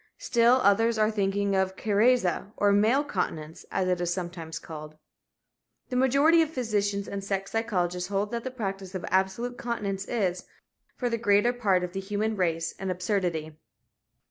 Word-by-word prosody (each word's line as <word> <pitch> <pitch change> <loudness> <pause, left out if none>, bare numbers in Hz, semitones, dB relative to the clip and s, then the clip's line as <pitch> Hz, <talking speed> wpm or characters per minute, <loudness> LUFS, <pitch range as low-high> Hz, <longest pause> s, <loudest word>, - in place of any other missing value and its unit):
Still 240 +2 +3
others 225 +3 +3
are 215 0 +3
thinking 200 -1 0
of 190 0 +1
Karezza, 210 -2 +2
or 205 0 +3
male 220 +8 +3
continence, 160 - -4
as 190 -1 -1
it 180 -1 0
is 175 0 0
sometimes 175 -3 -5
called. 155 -2 -9 0.9
The 255 - -3
majority 280 +6 +5
of 320 - +1
physicians 205 -7 -1
and 200 -1 -5
sex 195 0 -3
psychologists 180 -5 -1
hold 205 +1 -1
that 235 -1 -3
the 260 - -3
practice 195 -6 -5
of 180 - -4
absolute 190 +7 0
continence 200 -5 -3
is, 185 -6 -1 0.5
for 250 - -1
the 230 -1 -1
greater 205 +2 +3
part 200 -7 +1
of 180 0 -4
the 195 - -3
human 210 +3 -2
race, 165 -3 -1
an 195 - -3
absurdity. 180 -5 -2
200 Hz, 165 wpm, -27 LUFS, 185-230 Hz, 0.9 s, majority